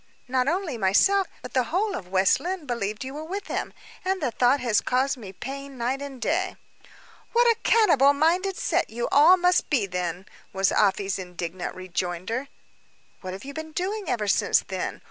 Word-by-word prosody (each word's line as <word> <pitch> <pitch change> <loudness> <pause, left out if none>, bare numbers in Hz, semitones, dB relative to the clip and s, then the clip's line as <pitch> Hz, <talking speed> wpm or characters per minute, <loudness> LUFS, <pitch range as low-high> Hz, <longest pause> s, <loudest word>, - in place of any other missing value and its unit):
Not 255 0 +1
only 330 - -1
myself, 370 - +3 0.2
but - - -8
the 255 -2 +2
whole 395 - 0
of 180 - -6
West 190 +4 +3
Lynne, 355 +2 -4
believed 215 -4 -3
you 265 +1 -6
were 300 +2 -6
with 390 +5 -5
him; - - -3 0.3
and 380 +1 0
the 265 -7 -1
thought 250 +4 +3
has 235 -4 +2
caused 260 +2 +1
me 215 -7 -9
pain 275 +6 -7
night 250 +3 -1
and 280 -2 -7
day." 370 +8 0 0.8
"What 480 +1 +4
a 465 -1 +3
cannibal 325 - +5
minded 350 +6 +1
set - - 0
you 235 +1 -3
all 320 +6 +7
must 360 0 +2
be, 255 -9 +2
then!" 180 -1 -4 0.3
was 195 0 +2
Afy's 195 -1 +1
indignant 180 -1 -5
rejoinder. 185 - -3 0.7
"What 185 0 -6
have 195 +5 -8
you 280 - -7
been 315 +1 -7
doing 395 +4 -2
ever 220 -4 -1
since, 195 - +3
then? - - -4
265 Hz, 185 wpm, -25 LUFS, -, 0.8 s, all